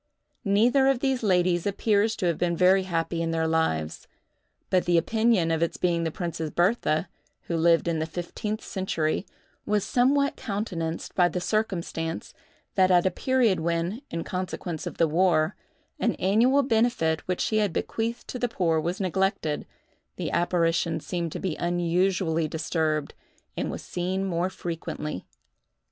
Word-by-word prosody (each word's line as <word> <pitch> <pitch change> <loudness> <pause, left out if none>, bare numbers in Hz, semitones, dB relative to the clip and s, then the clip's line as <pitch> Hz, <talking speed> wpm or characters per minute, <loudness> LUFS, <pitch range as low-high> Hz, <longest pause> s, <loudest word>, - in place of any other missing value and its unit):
Neither 235 +7 +4
of 270 -2 +3
these 265 -1 0
ladies 180 -3 +2
appears 210 +2 +2
to - - -2
have 170 -2 0
been 170 -1 0
very 185 +2 +4
happy 165 0 -1
in 165 - -1
their 165 0 0
lives: 80 - -1 0.6
but 185 -1 +3
the 175 -1 +3
opinion 220 -2 +2
of 160 0 0
its 170 - 0
being 170 -2 +1
the - - +1
Princess 165 -1 -4
Bertha, 175 -2 +1 0.4
who 170 - -3
lived 165 +1 +3
in 165 -2 0
the 160 - -1
fifteenth 180 +6 -4
century, 180 -3 -2 0.4
was 210 -1 +1
somewhat 280 +3 +2
countenanced 180 -6 -4
by 175 -1 +4
the 180 - -2
circumstance, 175 -5 -2 0.4
that 185 -1 +4
at 180 -1 +4
a 185 - +3
period 245 -2 +2
when, 170 +7 -1
in 165 0 -3
consequence 180 -3 -4
of - - -7
the 165 - +4
war, 170 +1 +2 0.4
an - - +1
annual 240 +9 +3
benefit 225 - +1
which 180 -1 -1
she 215 - +1
had 210 -3 +2
bequeathed 230 +7 -3
to 250 - -4
the 245 - 0
poor 170 -7 +1
was 170 +4 -2
neglected, 190 -4 -1 0.5
the - - -3
apparition 170 -1 +1
seemed 170 0 -3
to - - -5
be 180 -5 -2
unusually 175 -1 +1
disturbed, 155 -1 -1 0.4
and - - -2
was - - -6
seen 185 +2 -2
more 175 -1 0
frequently. 165 - -5
175 Hz, 155 wpm, -26 LUFS, 165-205 Hz, 0.6 s, Neither